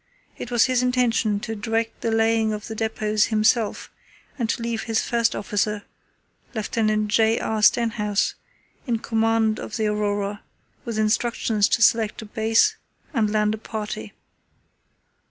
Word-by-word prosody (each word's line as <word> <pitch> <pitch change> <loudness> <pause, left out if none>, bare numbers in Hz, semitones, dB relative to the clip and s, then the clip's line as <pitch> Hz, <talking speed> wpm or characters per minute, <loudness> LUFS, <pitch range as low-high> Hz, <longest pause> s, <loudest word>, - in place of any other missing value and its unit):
It - - -6
was 240 -2 +4
his 255 -1 +1
intention 245 -4 +1
to 225 0 -4
direct 225 +2 -2
the 230 - -1
laying 225 -1 +2
of 210 0 -5
the 225 - -6
depots 215 -1 0
himself 220 +1 +1 0.4
and 235 -5 -2
to 230 - -1
leave 230 -1 -3
his 225 -1 0
first 235 -1 +1
officer, 205 0 -1 0.7
Lieut. 215 0 0
J. 220 +1 +3
R. 220 -1 -2
Stenhouse, 210 -2 +2 0.5
in 235 -2 +1
command 225 -1 +1
of 220 - -6
the 220 - 0
Aurora, 205 -1 -1 0.4
with 230 -2 -4
instructions 215 -1 +1
to 230 - +2
select 225 -1 +2
a - - -9
base 225 - +2 0.4
and 220 -5 +1
land 210 0 +2
a 220 - -5
party. 210 - -6
220 Hz, 145 wpm, -23 LUFS, 210-230 Hz, 0.7 s, was